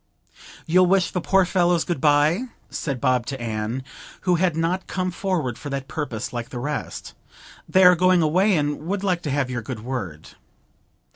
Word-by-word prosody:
'You'll 180 +2 +4
wish 185 -1 +2
the 180 - -2
poor 190 +2 +3
fellows 175 -2 +2
good 170 -7 -3
bye?' 150 - +3 0.3
said 140 -5 -3
Bob 125 -1 +1
to 135 -1 -4
Anne, 115 +2 -3 0.4
who 180 - +2
had 175 -1 +1
not 175 +3 -1
come 185 0 -2
forward 175 - -2
for 145 - -7
that 135 -1 -4
purpose 135 -10 -4
like 120 -1 -4
the 125 - -7
rest. 145 +4 -5 0.6
'They 190 - +5
are 180 0 +8
going 180 0 +4
away, 185 +5 +3
and 150 +1 -2
would 195 +1 -2
like 180 -3 0
to 150 - -4
have 135 -2 -1
your 120 -1 -3
good 115 -1 -6
word.' 105 -11 -5
155 Hz, 185 wpm, -23 LUFS, 130-180 Hz, 0.6 s, are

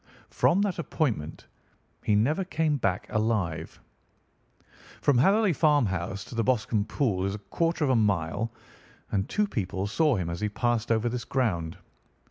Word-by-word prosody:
From 195 +4 +3
that 195 -4 -1
appointment 115 - -2 0.6
he 105 - +2
never 145 - +2
came 160 -4 0
back 95 -7 -1
alive. 100 -8 -1 1.2
"From 140 -4 +3
Hatherley 200 - +4
Farmhouse 100 - +1
to - - -11
the 115 -1 0
Boscombe 110 -4 +1
Pool 105 -11 0
is 100 +1 -1
a 105 - -11
quarter 165 -1 +1
of 135 - +2
a - - +3
mile, 100 0 0 0.6
and 100 0 -1
two 210 - +1
people 95 - -2
saw 150 +6 +2
him 90 -5 -2
as 85 - -5
he 105 - 0
passed 120 +1 0
over 115 +1 +2
this 120 0 -2
ground. 90 -10 -1
115 Hz, 155 wpm, -27 LUFS, 100-145 Hz, 1.2 s, Hatherley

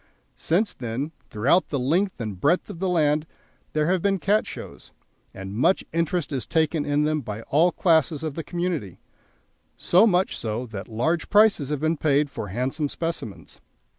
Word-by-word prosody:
Since 195 +7 0
then, 125 +5 -4 0.2
throughout 135 +12 +2
the 145 - -1
length 170 +9 0
and 105 -6 -5
breadth 170 +6 +2
of 165 - -10
the 190 0 0
land 155 -2 +2 0.5
there 155 0 +1
have 180 +2 +1
been 195 +1 +2
Cat 205 +4 +1
Shows, - - -10 0.4
and 95 +1 -8
much 130 - +2
interest 170 0 -1
is 135 -3 -3
taken 160 -2 +1
in 145 +1 +1
them 155 0 0
by 110 -2 -6
all 165 +8 +3
classes 160 -4 +2
of 155 -3 -3
the 165 - -5
community, 170 - -3 0.8
so 185 +6 +4
much 185 -2 +1
so 115 +2 -3
that 105 -4 -7
large 155 +10 -1
prices 205 -9 +4
have 150 -2 -2
been 160 +1 +1
paid 145 -1 +2
for 105 - -5
handsome 130 - -2
specimens. 165 - -6
155 Hz, 170 wpm, -24 LUFS, 130-175 Hz, 0.8 s, so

